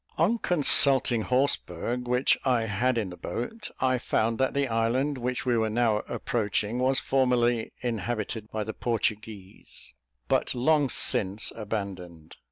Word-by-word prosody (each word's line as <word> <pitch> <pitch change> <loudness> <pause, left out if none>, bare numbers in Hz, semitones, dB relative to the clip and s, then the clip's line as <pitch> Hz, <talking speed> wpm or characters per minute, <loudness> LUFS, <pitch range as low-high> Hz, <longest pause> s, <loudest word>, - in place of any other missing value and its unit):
On 200 +9 +2
consulting 140 - +4
Horseberg, 125 -2 0
which 125 +2 +2
I 125 -3 +2
had 120 +4 0
in 105 -5 -2
the - - -8
boat, 210 - -5
I 130 -1 +1
found 115 -1 0
that 130 +1 0
the 140 -1 +1
island 125 +5 0
which 125 +1 -3
we 125 -1 +2
were 110 -1 +1
now 110 -1 +1
approaching 110 0 -2
was 130 +1 +2
formerly 120 -3 +1
inhabited 115 -2 -3
by 110 -1 -3
the 110 +1 -5
Portuguese, 110 -4 -4 0.3
but - - 0
long 145 +2 +2
since 100 -2 +1
abandoned. 95 -7 -6
120 Hz, 140 wpm, -27 LUFS, 110-130 Hz, 0.3 s, consulting